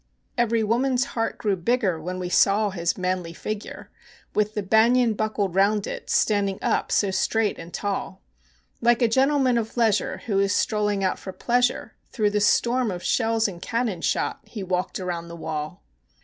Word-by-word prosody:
Every 230 Hz, -1 st, +1 dB
woman's 250 Hz, +4 st, +1 dB
heart 225 Hz, -1 st, -1 dB
grew 205 Hz, -4 st, 0 dB
bigger 190 Hz, -3 st, 0 dB
when 180 Hz, +3 st, -4 dB
we 180 Hz, -1 st, -3 dB
saw 200 Hz, +3 st, +3 dB
his 170 Hz, -2 st, -1 dB
manly 180 Hz, -2 st, -2 dB
figure, 215 Hz, +4 st, -6 dB, 0.4 s
With 210 Hz, 0 st, 0 dB
the 210 Hz, -, -1 dB
banyan 230 Hz, +4 st, +4 dB
buckled 210 Hz, -3 st, -1 dB
round 200 Hz, +2 st, +2 dB
it, -, -, -6 dB
standing 200 Hz, -2 st, +1 dB
up -, -, 0 dB
so 200 Hz, -2 st, +2 dB
straight 220 Hz, +2 st, 0 dB
and 165 Hz, +1 st, -9 dB
tall; 200 Hz, +2 st, -3 dB, 0.6 s
Like 240 Hz, +1 st, +3 dB
a -, -, +5 dB
gentleman 265 Hz, 0 st, +3 dB
of 225 Hz, +1 st, -6 dB
leisure 225 Hz, -4 st, +1 dB
who 200 Hz, -4 st, +1 dB
is 200 Hz, 0 st, +2 dB
strolling 210 Hz, -2 st, 0 dB
out 185 Hz, -, 0 dB
for 190 Hz, -, -7 dB
pleasure, 245 Hz, +5 st, 0 dB, 0.2 s
Through 210 Hz, -3 st, 0 dB
the 210 Hz, 0 st, 0 dB
storm 240 Hz, +3 st, +2 dB
of 180 Hz, -2 st, -5 dB
shells 225 Hz, -2 st, +1 dB
and 175 Hz, -4 st, -8 dB
cannon 230 Hz, -7 st, -2 dB
shot -, -, -1 dB
he 215 Hz, -1 st, -7 dB
walked 185 Hz, 0 st, -2 dB
around 175 Hz, -2 st, -4 dB
the 170 Hz, -, -8 dB
wall. 155 Hz, -, -5 dB
210 Hz, 175 wpm, -24 LUFS, 185-230 Hz, 0.6 s, a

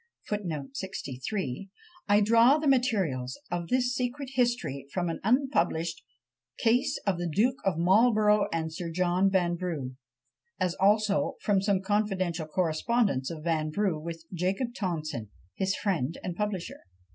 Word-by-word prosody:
I 190 Hz, -, -3 dB
draw 230 Hz, +6 st, +6 dB
the 310 Hz, -1 st, -1 dB
materials 195 Hz, -, +1 dB
of 175 Hz, -1 st, -2 dB
this 250 Hz, +2 st, +1 dB
secret 255 Hz, +2 st, -3 dB
history 240 Hz, -, 0 dB
from 175 Hz, -2 st, -1 dB
an -, -, -5 dB
unpublished 175 Hz, -, +1 dB, 0.6 s
"Case 240 Hz, +3 st, +2 dB
of 190 Hz, -4 st, +1 dB
the 175 Hz, -1 st, -2 dB
Duke 235 Hz, -, +2 dB
of 190 Hz, -5 st, +1 dB
Marlborough 210 Hz, +3 st, +4 dB
and 160 Hz, -1 st, -2 dB
Sir 170 Hz, +1 st, -4 dB
John 180 Hz, +3 st, +2 dB
Vanbrugh," 175 Hz, -7 st, -1 dB, 0.7 s
as 180 Hz, -2 st, +1 dB
also 205 Hz, +1 st, +3 dB
from 200 Hz, -2 st, +2 dB
some 195 Hz, -1 st, +1 dB
confidential 190 Hz, -5 st, 0 dB
correspondence 170 Hz, -, +1 dB
of 155 Hz, -2 st, -7 dB
Vanbrugh 160 Hz, +1 st, 0 dB
with 165 Hz, 0 st, -7 dB
Jacob 190 Hz, +8 st, -1 dB
Tonson, 155 Hz, -, -3 dB, 0.2 s
his 190 Hz, -, 0 dB
friend 165 Hz, -, -1 dB
and 180 Hz, -, -4 dB
publisher. 205 Hz, -3 st, -3 dB
190 Hz, 125 wpm, -28 LUFS, 165-215 Hz, 0.7 s, draw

